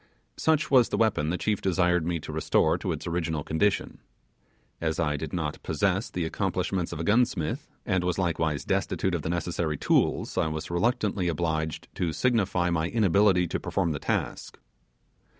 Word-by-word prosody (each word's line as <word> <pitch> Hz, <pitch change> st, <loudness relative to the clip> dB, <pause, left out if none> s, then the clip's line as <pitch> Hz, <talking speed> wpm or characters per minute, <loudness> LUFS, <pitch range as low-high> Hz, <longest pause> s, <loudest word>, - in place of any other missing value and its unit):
Such 155 Hz, -1 st, +1 dB
was 125 Hz, -4 st, +6 dB
the -, -, -1 dB
weapon 100 Hz, -9 st, +2 dB
the 90 Hz, -, 0 dB
chief 105 Hz, +1 st, -1 dB
desired 90 Hz, -3 st, +2 dB
me 85 Hz, -1 st, -1 dB
to -, -, -7 dB
restore -, -, +2 dB
to -, -, -3 dB
its -, -, -4 dB
original 80 Hz, -3 st, -2 dB
condition. 95 Hz, +7 st, 0 dB, 0.8 s
As 80 Hz, 0 st, -1 dB
I 75 Hz, -3 st, +1 dB
did 75 Hz, +1 st, -5 dB
not 80 Hz, -4 st, -3 dB
possess 95 Hz, +6 st, 0 dB
the 90 Hz, -2 st, -2 dB
accomplishments 90 Hz, 0 st, -1 dB
of -, -, -5 dB
a -, -, -2 dB
gunsmith, 105 Hz, -5 st, +1 dB, 0.2 s
and 95 Hz, -1 st, +1 dB
was 90 Hz, -1 st, 0 dB
likewise 80 Hz, -5 st, 0 dB
destitute 95 Hz, -, 0 dB
of 85 Hz, -, -1 dB
the 80 Hz, -, -4 dB
necessary 85 Hz, -2 st, -1 dB
tools, -, -, +1 dB
I -, -, +2 dB
was 80 Hz, +1 st, -4 dB
reluctantly 100 Hz, 0 st, 0 dB
obliged 80 Hz, -2 st, -2 dB
to 85 Hz, -3 st, -1 dB
signify 95 Hz, -8 st, +1 dB
my 80 Hz, -1 st, +1 dB
inability 100 Hz, -3 st, +3 dB
to -, -, -2 dB
perform 90 Hz, -4 st, -1 dB
the 75 Hz, -, -3 dB
task. -, -, -3 dB
85 Hz, 170 wpm, -27 LUFS, 80-95 Hz, 0.8 s, was